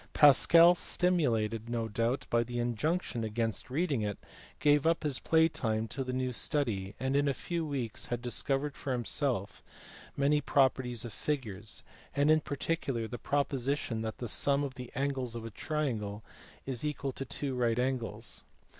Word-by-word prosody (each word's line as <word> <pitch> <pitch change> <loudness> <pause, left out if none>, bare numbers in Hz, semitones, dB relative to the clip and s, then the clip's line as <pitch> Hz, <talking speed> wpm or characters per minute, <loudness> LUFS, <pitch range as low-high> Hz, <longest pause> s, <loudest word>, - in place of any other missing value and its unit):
Pascal, 165 +4 +7
stimulated 120 -13 +1
no 115 -1 -1
doubt 115 +4 -1
by 120 - +4
the 120 +1 -5
injunction 120 +3 -1
against 110 +1 -2
reading 145 -2 0
it, 105 -1 -2 0.4
gave 145 0 +4
up 165 0 +2
his 145 -4 -1
play 160 0 +4
time 110 -7 -1
to 135 - -3
this 130 0 -3
new 130 -1 -1
study, 105 -9 -1
and 130 +2 0
in 145 0 +3
a 140 - +1
few 170 +3 -3
weeks 135 -7 -3
had 120 - -2
discovered 135 +4 -1
for 135 - -3
himself 120 -3 -1 0.6
many 145 +2 +3
properties 130 -5 +2
of 115 - -7
figures, 110 -9 -3 0.3
and 145 +2 +4
in 155 0 +5
particular 135 -4 -2
the 120 +1 -6
proposition 140 -4 0
that 110 -1 -4
the 120 - -4
sum 140 +5 +1
of 140 -2 -3
the 125 -2 -8
angles 135 -4 -1
of 115 -1 -5
a 115 - -6
triangle 110 -7 -2 0.4
is 130 -2 -2
equal 145 -2 -2
to 135 - -5
two 135 +1 -3
right 120 -2 +1
angles. 120 -3 -2
130 Hz, 165 wpm, -31 LUFS, 115-145 Hz, 0.6 s, Pascal